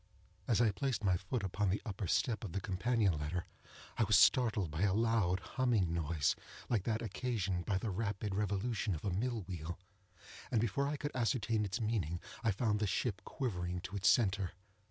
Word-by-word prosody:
As 115 -1 +3
I 110 -3 +4
placed 120 +1 -2
my 95 -3 +3
foot 95 +5 -3
upon 100 +1 0
the 100 - +1
upper 100 -3 -3
step 110 +4 +1
of 100 - -5
the 100 - 0
companion 100 +2 +1
ladder, 80 +4 -2 0.5
I - - +5
was - - +5
startled 110 -9 +4
by 80 +3 -3
a 100 -1 +3
loud, 110 -5 +2
humming 115 -10 +1
noise, 80 -4 +1 0.3
like 110 -6 +1
that 115 0 0
occasioned 100 -5 -2
by 95 - +2
the 110 +1 -2
rapid 100 0 -2
revolution 105 +1 0
of 75 - -7
a 100 - 0
mill 115 +4 -1
wheel, 85 -1 -5 0.7
and 115 - +2
before 120 +5 +1
I 145 +1 -2
could 145 +1 -3
ascertain 115 -3 +1
its 100 +4 -2
meaning, 105 -7 -1 0.2
I 115 - +3
found 105 +1 +1
the 105 - +1
ship 100 +1 -1
quivering 90 -8 -3
to 95 +3 -7
its 95 -1 +4
centre. 100 -5 +2
100 Hz, 190 wpm, -35 LUFS, 90-115 Hz, 0.7 s, I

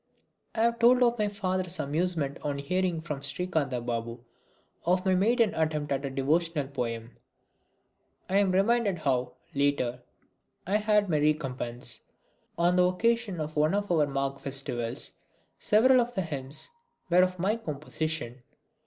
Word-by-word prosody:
I 220 - 0
have 235 0 +2
told 250 +2 +6
of 240 -1 +2
my 210 - +2
father's 185 -3 -2
amusement 155 -1 -1
on 145 -1 -2
hearing 175 +3 -1
from 150 -4 -5
Srikantha 145 -5 -1
Babu 115 0 -4 0.6
of 180 +2 +1
my 190 - +3
maiden 220 +4 +3
attempt 155 -2 -1
at 135 0 0
a 140 - -2
devotional 150 +3 0
poem. 115 -3 -4 1.1
I 190 - +1
am 200 -2 +3
reminded 200 +1 +2
how, 130 -5 0 0.2
later, 140 -3 0 0.6
I 200 +3 +2
had 210 -1 +2
my 155 -4 +1
recompense. 135 -5 -1 0.6
On 175 +1 +3
the 180 - +5
occasion 215 +1 +1
of 155 0 -4
one 155 +4 +3
of 205 -2 -1
our 155 -4 +3
Magh 135 0 -2
festivals 130 -4 -2 0.5
several 250 +4 +5
of 240 +1 -4
the 190 - +1
hymns 145 - -3 0.4
were 180 +1 +6
of 185 0 +1
my 195 +5 +1
composition. 155 - -4
160 Hz, 145 wpm, -28 LUFS, 140-195 Hz, 1.1 s, told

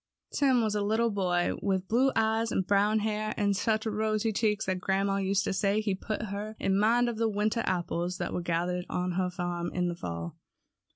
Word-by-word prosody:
Tim 260 -4 +3
was 215 -1 0
a 210 - 0
little 220 +3 +1
boy 180 -3 +1
with 190 -2 0
blue 255 +6 +3
eyes, 225 +1 +1 0.2
brown 205 +2 +3
hair, 215 0 -2
and 205 -1 +2
such 220 +2 0
rosy 215 0 0
cheeks 210 -1 +1
that 185 -1 -1
grandma 195 +1 0
used 195 +1 +1
to - - -1
say 200 +2 +1
he 215 -2 0
put 215 +3 -4
her 210 +1 -5
in 195 0 +1
mind 235 +3 +3
of 235 -2 -2
the 225 0 +1
winter 215 +2 0
apples 175 0 -1
that - - -3
were 180 - -1
gathered 175 +1 -1
on 180 0 -1
her 180 +1 0
farm 175 -1 -3
in 180 -1 +1
the 175 - -3
fall. 85 - -6
200 Hz, 205 wpm, -29 LUFS, 180-220 Hz, 0.2 s, Tim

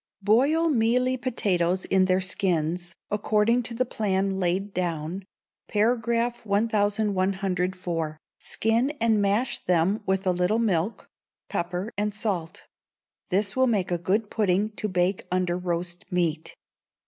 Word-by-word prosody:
Boil 285 +11 +3
mealy 250 +1 +2
potatoes 190 -8 0
in 190 -1 +3
their 185 0 +2
skins, 175 -2 -1 0.2
according 215 +3 +2
to 235 0 -6
the 255 +2 +1
plan 195 -4 -1
laid 190 +2 0
down 175 +1 -3 0.4
(par. 220 +4 +3
1104) 200 -7 0 0.2
skin 230 +4 +1
and 220 -2 +3
mash 215 +5 +1
them 180 +4 +2
with 190 +1 0
a 185 - +3
little 180 +4 +1
milk, 205 -3 0 0.4
pepper 180 +5 -3
and 210 0 -1
salt: 185 -6 -3 0.6
this 200 +1 0
will 260 0 +3
make 200 -7 0
a 175 - 0
good 200 +5 0
pudding 205 0 +1
to 215 0 -4
bake 185 +1 0
under 180 -1 +1
roast 175 -1 -4
meat. 165 -3 -1
195 Hz, 125 wpm, -26 LUFS, 180-220 Hz, 0.6 s, Boil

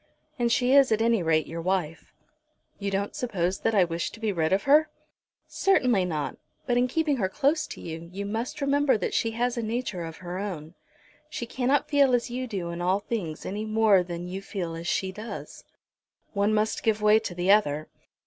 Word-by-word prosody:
And 235 -1 +2
she 255 0 +3
is 275 -3 +6
at 220 - +3
any 230 -2 +2
rate 160 -2 +2
your 165 +1 -6
wife." 175 -3 -2 0.7
"You 200 -1 -2
don't 200 +1 -2
suppose 190 -6 -1
that 225 - 0
I 195 - +6
wish 170 0 -2
to 225 - -13
be 220 -2 0
rid 160 -3 0
of 195 +1 +2
her?" 300 +3 +5 0.6
"Certainly 250 - +2
not; 155 -4 -3 0.3
but 245 - +1
in 245 +1 +3
keeping 300 +1 0
her 190 -5 0
close 295 +8 +1
to - - -9
you 165 0 -7
you 200 +2 -5
must 225 +7 -4
remember 280 -2 +3
that 185 - -3
she 230 - +1
has 245 +1 0
a - - 0
nature 220 -5 -3
of 165 -1 -7
her 180 0 -6
own. 170 -6 -5 0.6
She 275 -6 -4
cannot 260 +4 0
feel 280 -4 +4
as 240 0 -2
you 255 +1 -3
do 185 -7 -4
in 170 0 -5
all 185 +3 +2
things 195 -8 -4
any 205 +3 -3
more 215 -3 +4
than 175 0 -5
you 190 +2 -5
feel 185 -4 -4
as 165 +1 -6
she 190 -1 0
does." 215 +4 -8 0.7
"One 200 +1 +2
must 215 0 0
give 215 -1 0
way 210 +1 +6
to 205 -5 -6
the 180 +2 +2
other." 155 -8 +2
205 Hz, 205 wpm, -27 LUFS, 180-240 Hz, 0.7 s, is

